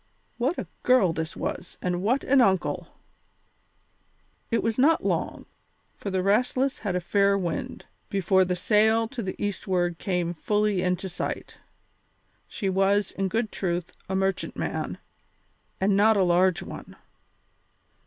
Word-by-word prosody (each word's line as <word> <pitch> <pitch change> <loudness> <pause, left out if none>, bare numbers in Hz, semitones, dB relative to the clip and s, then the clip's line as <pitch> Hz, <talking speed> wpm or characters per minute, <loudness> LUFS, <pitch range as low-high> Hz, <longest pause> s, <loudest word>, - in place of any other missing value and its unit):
"What 270 +9 0
a - - -3 0.2
girl 250 -10 +4
this 160 0 -4
was, 180 - -5
and 180 -1 -1
what 245 +7 +1
an 270 0 +4
uncle!" 190 -6 +1 1.6
It 230 - +1
was 225 +1 0
not 315 +5 +4
long, - - -1 0.5
for 200 - -5
the 185 -1 0
Restless 250 +6 +1
had 195 -4 -2
a - - +2
fair 200 +2 +2
wind, 175 -4 -4 0.2
before 190 -1 +3
the 180 0 -1
sail 220 +4 +3
to 235 - -5
the 190 -3 -4
eastward 180 -4 -1
came 180 -3 -1
fully 205 +2 0
into 180 +1 -1
sight. 175 - -5 0.9
She 200 - -4
was, 195 +1 +2
in 195 0 -2
good 220 +2 -1
truth, 175 -2 -3
a 190 - -1
merchantman, 195 0 -2 0.8
and 195 +1 +2
not 215 +2 +5
a 195 - +4
large 180 0 +3
one. - - -9
195 Hz, 140 wpm, -26 LUFS, 180-220 Hz, 1.6 s, not